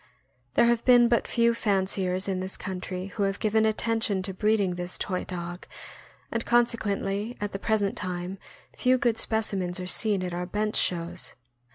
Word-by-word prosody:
There - - +5
have 235 -1 +2
been 245 -2 +6
but 235 -1 +1
few 235 0 +3
fanciers 190 -3 0
in 190 -2 -1
this 185 +1 -4
country 185 -1 -5
who 210 - -4
have 195 0 +1
given 220 +1 +2
attention 220 -3 +1
to 190 0 -3
breeding 205 -1 +1
this 175 0 -4
toy 185 -2 -3
dog, 175 0 -6 0.6
and 230 0 -1
conse 240 0 +3
quently 205 +1 -2
at 205 0 -3
the 195 - -5
present 205 -2 0
time 185 +1 -4 0.4
few 255 0 +3
good 235 -3 +1
specimens 195 -5 0
are 180 - -4
seen 200 +1 +2
at 180 -1 -4
our 180 +1 -3
bench 210 +3 -1
shows. 175 0 -1
200 Hz, 175 wpm, -27 LUFS, 185-220 Hz, 0.6 s, been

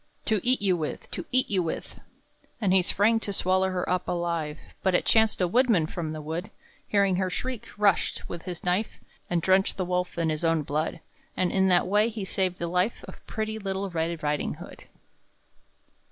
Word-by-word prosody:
"To 215 -2 +2
eat 255 -3 +3
you 190 -2 +4
with! 155 -3 -5
to - - -5
eat 255 0 +3
you 195 -4 +1
with!" 165 -2 -5 0.6
And 200 -5 +2
he 190 - +6
sprang 210 +5 +2
to 210 - -4
swallow 190 0 +2
her 185 -1 -2
up 180 0 0
alive; 170 -3 -2 0.2
But 190 -2 +2
it - - +2
chanced 220 -1 +4
a 180 - +3
woodman 225 -4 +3
from 160 0 -4
the 155 -1 -6
wood, 165 +6 -4 0.4
Hearing 200 -3 +3
her 185 0 0
shriek, 250 +5 -4
rushed, 205 -3 +2
with 170 - -6
his 180 -2 -6
knife, 180 +5 0 0.3
And 170 -2 0
drenched 190 +2 +3
the 185 - -1
wolf 180 0 -1
in 165 -2 +1
his 155 +1 -3
own 165 -2 +2
blood. 155 +3 -2 0.4
And 185 - +1
in 190 -1 +3
that 180 -2 +4
way 210 +4 +3
he 215 -4 -5
saved 185 -1 0
the 170 - -3
life 180 +6 0
Of - - -12
pretty 220 0 -3
little 195 -1 -3
Red 165 -1 -2
Riding 150 0 -1
hood. - - -11
185 Hz, 195 wpm, -27 LUFS, 170-200 Hz, 0.6 s, he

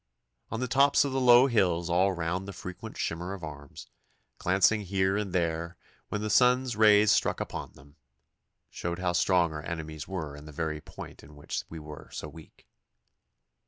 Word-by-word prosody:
On 115 - -4
the 125 - -1
tops 140 +3 +4
of 140 - -2
the 135 0 0
low 125 0 +7
hills 90 -9 +1
all 90 +3 +3
round 90 +2 -3
the 100 - -6
frequent 90 0 -8
shimmer 85 +3 -3
of 95 - -12
arms, 75 -2 -9 0.5
glancing 95 +4 +3
here 95 0 0
and 105 -2 -2
there 85 -1 -1 0.3
when 105 - -3
the 110 - -2
sun's 125 -1 +3
rays 105 -1 +6
struck - - +2
upon - - -5
them, 70 +3 -19 0.7
showed 85 0 -4
how 90 -1 -1
strong 85 -2 +2
our 75 - -5
enemies 80 -2 -6
were 80 -7 -5
in 75 +1 -11
the 75 - -10
very 80 +1 -3
point - - -11
in 75 +2 -15
which 75 - -5
we 80 - -8
were 75 -1 -10
so - - -6
weak. 75 +1 -15
90 Hz, 180 wpm, -28 LUFS, 80-105 Hz, 0.7 s, low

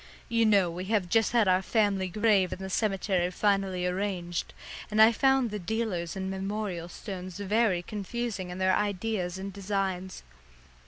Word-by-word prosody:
You 230 -1 +3
know 195 -5 +4
we 180 +2 -5
have 200 -3 0
just 225 +4 +3
had 230 -4 +3
our 185 0 +4
family 200 -2 +1
grave 200 -1 +2
in - - -4
the 190 0 -6
cemetery 195 -3 0
finally 195 -1 0
arranged, 180 -2 -2 0.4
and 215 0 -1
I 220 +1 +8
found 265 -1 +2
the 210 - -3
dealers 185 -3 -2
in 190 0 -3
memorial 190 -2 -3
stones 185 -1 -7
very 205 -2 +1
confusing 210 -1 -4
in 180 - -6
their 185 0 +3
ideas 200 -3 -1
and 195 +1 -6
designs. 190 -2 -3
195 Hz, 160 wpm, -28 LUFS, 185-215 Hz, 0.4 s, I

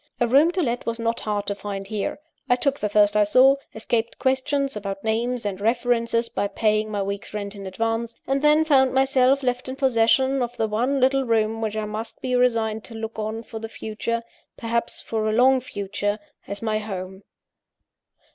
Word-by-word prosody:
A 240 - +2
room 280 +7 +5
to 365 -1 0
let 240 -2 -2
was 230 0 -1
not 230 0 -1
hard 205 -1 -2
to 200 - -1
find 200 0 -6
here. 210 -1 -3 0.3
I 245 - +5
took 280 +2 0
the 210 - -1
first 205 0 +4
I 210 - +5
saw; 260 +6 +5 0.2
escaped 225 +1 -1
questions 270 +1 0
about 195 -1 -5
names 230 +2 -1
and 200 -1 -3
references 230 0 +1
by 200 - -2
paying 215 +1 +1
my 205 -2 -1
week's 200 +1 -5
rent 200 -1 -4
in 200 -2 -8
advance; 225 +3 -2
and 270 +1 0
then 300 +1 +4
found 265 -4 +4
myself 270 0 +3
left 250 0 -1
in 260 - -4
possession 265 +1 +3
of 245 0 -3
the 225 - +1
one 245 +6 0
little 265 +1 +3
room 225 -1 +1
which 220 -1 -2
I 215 - -1
must 215 +2 -6
be 255 - -3
resigned 225 -3 +1
to 230 - -9
look 225 0 -6
on 220 +1 -3
for 225 -1 -8
the 225 0 -6
future 225 +2 -3 0.3
perhaps 235 0 -2
for 220 -1 -1
a - - 0
long 260 +3 +5
future! 205 -3 -3 0.3
as 200 +2 -4
my 215 -1 0
home. 190 -2 -6
225 Hz, 195 wpm, -24 LUFS, 210-255 Hz, 0.3 s, room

